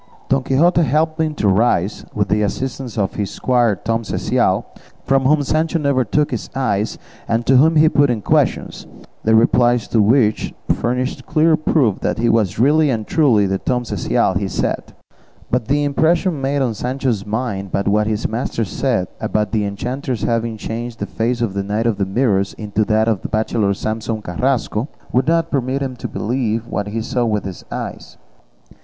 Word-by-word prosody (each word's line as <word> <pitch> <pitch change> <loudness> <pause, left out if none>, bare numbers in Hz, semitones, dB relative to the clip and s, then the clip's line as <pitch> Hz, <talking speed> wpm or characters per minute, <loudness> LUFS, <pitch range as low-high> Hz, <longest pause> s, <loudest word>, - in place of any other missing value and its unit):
Don 135 0 +3
Quixote 165 +7 +3
helped 155 +2 +1
him 155 -1 -1
to 105 - 0
rise, 100 -1 +1
with 105 -2 +1
the 105 - +2
assistance 125 +3 -3
of 100 -3 0
his 100 -2 -3
squire 120 -4 +1
Tom 115 +5 -2
Cecial; 110 - 0 0.4
from 135 -1 +2
whom 145 +2 +3
Sancho 155 +4 0
never 140 -4 +1
took 145 +7 0
his 120 - -4
eyes, 110 -6 -1 0.3
and 115 +1 0
to 130 - +5
whom 160 +5 +5
he 155 +1 +6
put 145 -3 +3
questions, - - 0 0.4
the 110 0 +4
replies 120 +1 +3
to 110 - +3
which 110 0 +2 0.2
furnished 125 +2 -2
clear 160 +1 +3
proof 150 - +1
that - - -1
he 115 +1 +1
was 110 -4 +1
really 150 +6 +4
and 110 -4 -1
truly 125 -10 +3
the 95 0 -1
Tom 125 -1 -1
Cecial - - 0
he - - -2
said; - - -2 0.6
but 120 -3 0
the 145 +3 +2
impression 160 +2 +1
made 140 +1 0
on 120 -3 0
Sancho's 125 -2 -2
mind 105 -3 -3
by 100 - 0
what 105 +1 +1
his 110 0 -1
master 115 0 -2
said 110 -3 -1
about 105 -2 -1
the 110 -2 +1
enchanters 125 +3 -4
having 115 -1 -1
changed 115 +2 -5
the - - -3
face 120 +2 -2
of 115 -5 -1
the 100 - -1
Knight 105 +3 -2
of 115 -4 0
the 100 - 0
Mirrors 100 -2 +1
into 105 0 -1
that 110 +1 +2
of 110 -4 +1
the - - -5
bachelor 110 -1 0
Samson 110 +1 -3
Carrasco, 120 +4 -1 0.2
would 130 +3 +1
not 165 0 +1
permit 135 0 -1
him 130 -2 -4
to - - -5
believe 115 -1 -2
what 105 -3 -3
he 110 +2 -3
saw 125 +1 -1
with 105 -3 -1
his 95 -3 -7
eyes. - - -6
120 Hz, 185 wpm, -19 LUFS, 105-135 Hz, 0.6 s, he